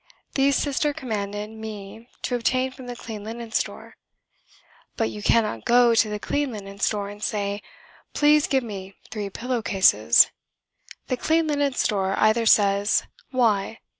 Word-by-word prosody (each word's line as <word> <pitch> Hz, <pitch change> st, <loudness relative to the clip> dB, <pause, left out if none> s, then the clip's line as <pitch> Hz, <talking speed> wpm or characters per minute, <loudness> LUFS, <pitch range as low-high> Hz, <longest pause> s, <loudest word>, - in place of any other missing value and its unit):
These 275 Hz, 0 st, +3 dB
Sister 290 Hz, +1 st, 0 dB
commanded 210 Hz, -4 st, -4 dB
me 220 Hz, +1 st, -9 dB
to -, -, -2 dB
obtain 255 Hz, +2 st, 0 dB
from 260 Hz, -1 st, -11 dB
the 245 Hz, -, -5 dB
Clean 220 Hz, -3 st, -8 dB
Linen 230 Hz, +1 st, -7 dB
Store. -, -, -3 dB, 1.0 s
But 225 Hz, -, 0 dB
you 210 Hz, -, -8 dB
cannot 210 Hz, -, +1 dB
go 240 Hz, 0 st, +5 dB
to 225 Hz, -1 st, +3 dB
the 210 Hz, -, -3 dB
Clean 285 Hz, +5 st, -2 dB
Linen 200 Hz, -2 st, -9 dB
Store 205 Hz, -1 st, 0 dB
and 205 Hz, +1 st, -10 dB
say 205 Hz, -1 st, -2 dB, 0.5 s
"Please 300 Hz, 0 st, +4 dB
give 265 Hz, -1 st, +1 dB
me 195 Hz, -4 st, -8 dB, 0.2 s
three 210 Hz, -2 st, -4 dB
pillow 245 Hz, +4 st, -3 dB
cases." 195 Hz, -2 st, +5 dB, 0.7 s
The 255 Hz, -, -2 dB
Clean 320 Hz, +5 st, +2 dB
Linen 285 Hz, -2 st, 0 dB
Store 195 Hz, -5 st, 0 dB
either 220 Hz, +1 st, +3 dB
says 200 Hz, -1 st, +4 dB, 0.3 s
"Why?" 225 Hz, -5 st, +1 dB
220 Hz, 150 wpm, -24 LUFS, 205-255 Hz, 1.0 s, go